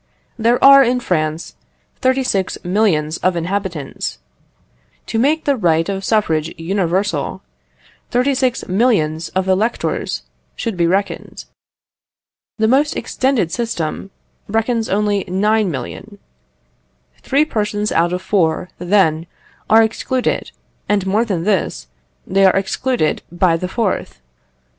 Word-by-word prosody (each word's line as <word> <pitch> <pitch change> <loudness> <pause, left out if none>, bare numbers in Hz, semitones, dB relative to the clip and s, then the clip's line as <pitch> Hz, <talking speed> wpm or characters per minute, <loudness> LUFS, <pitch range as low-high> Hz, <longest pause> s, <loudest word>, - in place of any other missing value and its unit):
There 235 +1 +2
are, 275 0 +9
in 250 0 +1
France, 155 -6 -2 0.5
36,000,000 195 - 0
of 185 -1 +1
inhabitants. 175 -4 -3 0.9
To 225 - -2
make 300 +6 +1
the 285 - +2
right 165 -7 +1
of 195 -1 -3
suffrage 165 -8 +1
universal, 175 - -1 0.7
36,000,000 235 - +1
of 190 0 0
electors 205 +5 -1 0.3
should 230 -4 -3
be 170 -1 +2
reckoned. 195 +3 -2 1.1
The 220 -1 +2
most 280 +5 +2
extended 250 -7 0
system 195 -7 -3 0.4
reckons 225 +1 0
only 205 0 +1
9,000,000. 200 - -1 1.0
Three 280 +3 +2
persons 210 -5 -2
out 170 +1 +2
of 180 +1 -3
four, 180 -3 +1
then, 175 -3 +2 0.4
are 225 +1 +7
excluded; 245 +3 -1 0.4
and 205 -2 +1
more 205 +4 +2
than 185 -7 -2
this, 195 - -1 0.4
they 195 +1 +2
are 190 - +5
excluded 195 -1 0
by 175 -1 +2
the 180 +2 -3
fourth. 195 - -2
200 Hz, 110 wpm, -18 LUFS, 175-230 Hz, 1.1 s, are